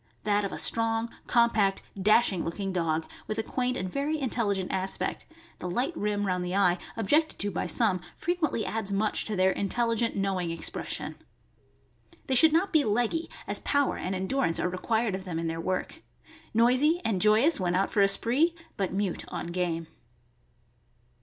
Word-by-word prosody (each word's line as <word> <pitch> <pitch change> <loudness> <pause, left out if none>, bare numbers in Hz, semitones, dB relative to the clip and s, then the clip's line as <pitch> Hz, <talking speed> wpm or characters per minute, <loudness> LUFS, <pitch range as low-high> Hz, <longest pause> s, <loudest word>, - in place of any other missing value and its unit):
— - - -39
That 205 0 +3
of 200 - -3
a - - -5
strong, 225 0 +1 0.2
compact, 225 -5 +3
dash 210 +3 +4
ing 180 - -2
looking 190 +3 -3
dog, 165 -2 0 0.2
with 215 - -3
a 220 - 0
quaint 250 +2 -1
and 185 - -3
very 280 +10 -1
intelligent 215 -8 -1
aspect 190 0 -3 0.3
(the 180 - -4
light 255 - -1
rim 205 -3 -1
round 180 -2 -1
the 180 +1 -3
eye, 180 -3 +3 0.2
objected 300 +9 +2
to 205 0 -2
by 175 - -2
some, 205 -7 +1
fre 345 - -2
quently 310 -10 0
adds 220 -2 -3
much 210 +2 0
to 215 - -3
their 190 0 +3
intelligent, 230 +3 0
knowing 195 -3 -1
expres 165 0 -4
sion). - - -5 1.1
They 265 - -1
should 305 +5 +7
not 360 +5 +1
be 310 -2 +5
leggy, 240 +8 0 0.2
as - - -2
power 285 -1 +1
and 185 +1 -3
endurance 190 -1 0
are 180 - 0
required 220 +4 0
of 190 0 -4
them 180 -4 -4
in 165 - -2
their 165 0 -3
work. 185 +1 -3 0.5
Noisy 255 +9 +3
and 195 -5 0
joyous 220 +9 +4
when 180 -1 0
out 195 +2 +1
for 205 - +2
a 195 - +6
spree, 270 - +3 0.2
but 195 -3 -1
mute 195 -2 -2
on 170 - -5
game. 170 -2 -1
205 Hz, 185 wpm, -28 LUFS, 185-240 Hz, 1.1 s, should